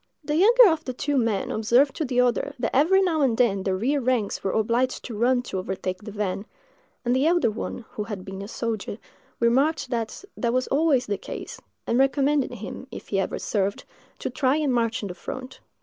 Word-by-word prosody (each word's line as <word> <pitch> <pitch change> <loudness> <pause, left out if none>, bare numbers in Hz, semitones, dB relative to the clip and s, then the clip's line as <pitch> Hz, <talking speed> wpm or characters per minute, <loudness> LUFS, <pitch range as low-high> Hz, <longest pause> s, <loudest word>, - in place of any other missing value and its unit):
The 295 0 -1
younger 460 +7 +7
of 320 -1 -1
the 255 - -4
two 285 +3 -1
men 225 -6 +1
observed 240 +6 +3
to 315 - -1
the 250 -2 0
other 245 -1 0
that 235 -3 -2
every 370 +8 +5
now 330 -4 +1
and 250 -5 +2
then 205 -6 +2
the 190 0 0
rear 270 +9 0
ranks 245 -4 0
were 195 - 0
obliged 235 +5 0
to 235 - -6
run 245 +3 +2
to 190 - -4
overtake 185 0 -4
the 210 - -8
van; 205 0 -3 0.6
and 245 +1 +2
the 270 +4 +3
elder 340 -9 +3
one, 225 +2 -5
who 210 - -4
had 205 -4 -6
been 195 -1 -7
a 200 - -6
soldier, 220 -3 -3 0.4
remarked 270 +8 +2
that 230 - -3
that 235 -2 -1
was 255 0 +1
always 280 -3 +3
the 205 -2 -2
case, - - -7 0.2
and 240 - +1
recommended 275 0 +2
him, 220 +4 -8
if - - -10
he 195 - +1
ever 190 - -1
served, 200 -1 -1 0.3
to - - -4
try 265 -1 +2
and 300 -4 +1
march 230 -2 0
in - - -2
the 180 - -6
front. 255 +7 -8
245 Hz, 210 wpm, -25 LUFS, 210-275 Hz, 0.6 s, younger